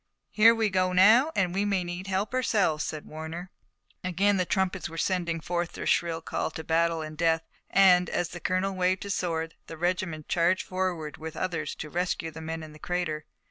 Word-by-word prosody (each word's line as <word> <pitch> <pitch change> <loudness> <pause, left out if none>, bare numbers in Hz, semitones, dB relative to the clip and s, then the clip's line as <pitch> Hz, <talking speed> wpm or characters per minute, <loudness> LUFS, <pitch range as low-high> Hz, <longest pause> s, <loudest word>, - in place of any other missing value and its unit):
"Here 225 +2 +6
we 220 -2 +1
go 185 -1 +1
now, 220 - +6
and 180 -2 +1
we 195 +2 +1
may 200 -3 +1
need 175 +2 -6
help 195 +4 -1
ourselves!" 205 -11 +1
said 155 -1 -5
Warner. 160 +4 -7 0.5
Again 195 +3 +2
the 185 -1 0
trumpets 190 -3 0
were 165 - -9
sending 170 -2 0
forth 175 +1 -2
their - - -6
shrill 165 -1 +1
call - - -2
to 160 - -7
battle 165 0 +1
and 155 0 -7
death, 165 0 +2 0.3
and, 180 -3 +5
as 175 - -1
the 175 - -8
colonel 185 +2 0
waved 185 0 +1
his 200 -1 -2
sword, 165 -3 -2
the 165 - -8
regiment 170 -2 -2
charged 175 +1 +2
forward 180 -5 -3
with 160 0 -7
others 165 -5 -2
to 155 - -7
rescue 175 -2 -1
the 160 +1 -9
men 160 0 -5
in 155 -1 -10
the 155 - -14
crater. 160 -3 -2
175 Hz, 200 wpm, -28 LUFS, 160-190 Hz, 0.5 s, Here